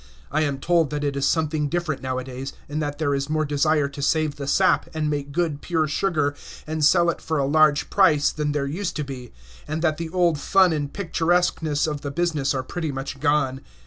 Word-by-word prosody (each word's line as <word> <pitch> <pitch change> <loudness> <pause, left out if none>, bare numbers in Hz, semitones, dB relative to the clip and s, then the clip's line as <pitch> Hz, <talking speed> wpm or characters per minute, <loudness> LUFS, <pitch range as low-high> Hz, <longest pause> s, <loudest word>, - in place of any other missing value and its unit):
I 155 - +1
am 145 -3 0
told 165 +1 +2
that 150 -1 -3
it 140 -1 -1
is 140 0 +1
something 155 -2 0
different 160 -5 -2
nowadays, 130 +1 -4
and 150 +1 -3
that 145 -1 -3
there 145 -3 0
is 140 +1 -2
more 155 0 +1
desire 150 0 +2
to 140 0 -8
save 155 0 +1
the 140 -1 -5
sap, - - +2
and 155 -1 0
make 145 -1 -3
good, 155 -2 -1
pure 160 -3 0
sugar, 150 -2 0 0.3
and 155 0 -3
sell 170 +3 +5
it - - -10
for 160 - -2
a 140 - +1
large 150 +1 +3
price, 155 -7 +4
than 150 -1 -2
there 145 -1 -1
used 175 +7 -3
to 150 - -2
be, 130 -4 -8 0.4
and 155 +2 -3
that 155 -2 +2
the 165 0 -4
old 170 -3 +2
fun 190 +1 +4
and 145 -2 -2
picturesqueness 165 -4 0
of 150 -2 -3
the 145 - -4
business 150 -3 0
are 130 - -1
pretty 160 +3 -4
much 135 +1 -5
gone. 145 -3 +1
150 Hz, 215 wpm, -23 LUFS, 140-160 Hz, 0.4 s, sell